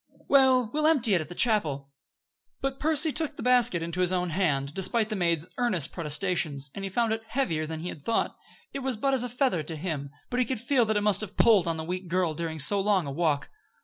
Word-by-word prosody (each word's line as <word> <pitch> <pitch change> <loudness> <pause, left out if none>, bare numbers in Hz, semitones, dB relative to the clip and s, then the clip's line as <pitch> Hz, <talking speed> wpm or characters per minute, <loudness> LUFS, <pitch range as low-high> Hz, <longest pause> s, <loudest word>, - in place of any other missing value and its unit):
"Well, 260 -4 +4
we'll 305 +1 +2
empty 260 -9 +3
it 175 - +3
at 155 - -8
the 175 - -8
chapel." 150 - +2 0.7
But 270 0 -3
Percy 310 0 +1
took 310 0 -3
the - - -7
basket 245 -9 +3
into 170 +2 -3
his 180 0 +3
own 180 -2 -1
hand, 145 -6 0
despite 215 +4 +1
the 215 - -2
maid's 170 -4 0
earnest 195 - 0
protestations, 150 -4 -2
and 195 - -7
he 195 - -3
found 225 +3 +1
it 225 - -3
heavier 175 - -1
than 160 0 -5
he 175 - -4
had 150 - -9
thought. 230 +9 -1 0.4
It 275 - -3
was 260 -3 -2
but 270 +5 0
as 260 - +2
a 245 - -2
feather 245 - 0
to 160 +2 -6
him, 150 -4 -4 0.2
but 250 - 0
he 250 - +3
could 255 -3 -2
feel 245 +1 +2
that 220 -1 0
it - - +1
must 205 -1 +2
have 210 -2 -7
pulled 210 -7 +5
on 165 -1 0
the 160 - -4
weak 180 +2 -5
girl 175 -2 0
during 160 0 -4
so 155 +8 +2
long 195 -4 +2
a 140 - -5
walk. 150 -1 -1
190 Hz, 245 wpm, -27 LUFS, 160-245 Hz, 0.7 s, pulled